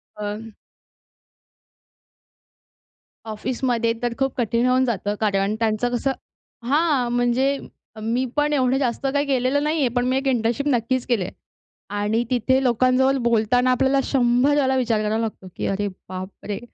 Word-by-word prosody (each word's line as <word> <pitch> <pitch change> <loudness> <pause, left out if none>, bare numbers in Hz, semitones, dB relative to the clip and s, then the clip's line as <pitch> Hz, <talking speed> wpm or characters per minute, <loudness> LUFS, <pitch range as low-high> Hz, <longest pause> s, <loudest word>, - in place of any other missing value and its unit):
पण 210 +2 -5 2.8
ऑफिसमध्ये 235 +1 -1
तर 240 -1 0
खूप 270 -1 0
कठीण 235 0 +1
होऊन 255 +1 +3
जातं, 205 -3 -1
कारण 200 0 +1
त्यांचं 225 +1 0
कसं 270 +3 0 0.6
हां, 285 -4 +2
म्हणजे 245 +3 +2 0.5
मी 240 +4 0
पण 295 0 +1
एवढं 260 -2 +2
जास्त 265 0 -1
काही 285 0 +1
केलेलं 270 +1 +1
नाहीये, 300 -3 +1
पण 245 +1 -1
मी 260 +1 +1
एक 270 - -2
इंटर्नशिप 240 +2 0
नक्कीच 250 -1 0
केलीय. 220 -8 0 0.6
आणि 210 +3 0
तिथे 260 +2 +2
लोकांजवळ 255 +2 +3
बोलताना 235 +2 +2
आपल्याला 265 +2 +2
शंभर 255 +2 +2
वेळला 265 -2 +2
विचार 235 -4 +1
करावा 215 +1 0
लागतो, 215 -4 -5
की - - -4
"अरे, 205 +1 -1 0.2
बाप 185 +1 -5 0.2
रे!" 200 -1 -3
245 Hz, 140 wpm, -22 LUFS, 225-265 Hz, 2.8 s, होऊन